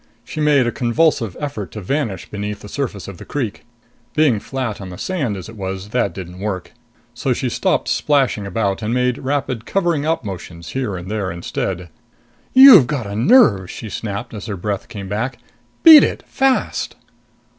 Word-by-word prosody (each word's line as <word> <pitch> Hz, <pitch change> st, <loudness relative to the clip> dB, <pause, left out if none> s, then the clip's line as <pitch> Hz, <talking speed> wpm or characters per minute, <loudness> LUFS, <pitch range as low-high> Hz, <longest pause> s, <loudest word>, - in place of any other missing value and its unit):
She 155 Hz, -, -7 dB
made 150 Hz, -4 st, +4 dB
a 120 Hz, -, 0 dB
convulsive 120 Hz, -, +1 dB
effort 135 Hz, -, -4 dB
to 105 Hz, -, -5 dB
vanish 105 Hz, -, -2 dB
beneath 105 Hz, 0 st, -4 dB
the -, -, -10 dB
surface 110 Hz, -4 st, -4 dB
of 100 Hz, -3 st, -9 dB
the -, -, -8 dB
creek. 115 Hz, -8 st, -4 dB, 0.5 s
Being 145 Hz, -8 st, +3 dB
flat 125 Hz, -4 st, -4 dB
on 95 Hz, -, -7 dB
the 90 Hz, -, -9 dB
sand 135 Hz, -, -2 dB
as 90 Hz, -, -8 dB
it 110 Hz, -, -11 dB
was, 95 Hz, 0 st, -5 dB
that 125 Hz, +3 st, 0 dB
didn't 90 Hz, -1 st, -9 dB
work. 95 Hz, -3 st, -4 dB, 0.4 s
So -, -, -1 dB
she -, -, -2 dB
stopped -, -, 0 dB
splashing 135 Hz, -8 st, +1 dB
about 100 Hz, 0 st, -1 dB
and 110 Hz, +3 st, -1 dB
made 125 Hz, -1 st, +1 dB
rapid 130 Hz, -4 st, -2 dB
covering 170 Hz, -6 st, 0 dB
up 160 Hz, -5 st, -1 dB
motions 85 Hz, -4 st, -7 dB
here 125 Hz, -8 st, -3 dB
and 90 Hz, +1 st, -8 dB
there 105 Hz, -3 st, -2 dB
instead. 90 Hz, +1 st, -4 dB, 0.6 s
"You've 260 Hz, -, +9 dB
got 140 Hz, -6 st, -2 dB
a 100 Hz, 0 st, -5 dB
nerve!" 115 Hz, -, +5 dB
she 110 Hz, -, -7 dB
snapped 110 Hz, +4 st, -5 dB
as 105 Hz, +1 st, -7 dB
her 105 Hz, -3 st, -4 dB
breath 100 Hz, +2 st, -3 dB
came 100 Hz, -2 st, -7 dB
back. 110 Hz, +7 st, -3 dB, 0.5 s
"Beat 320 Hz, -3 st, +11 dB
it! -, -, -1 dB
Fast!" 270 Hz, -1 st, 0 dB
110 Hz, 180 wpm, -19 LUFS, 100-140 Hz, 0.6 s, Beat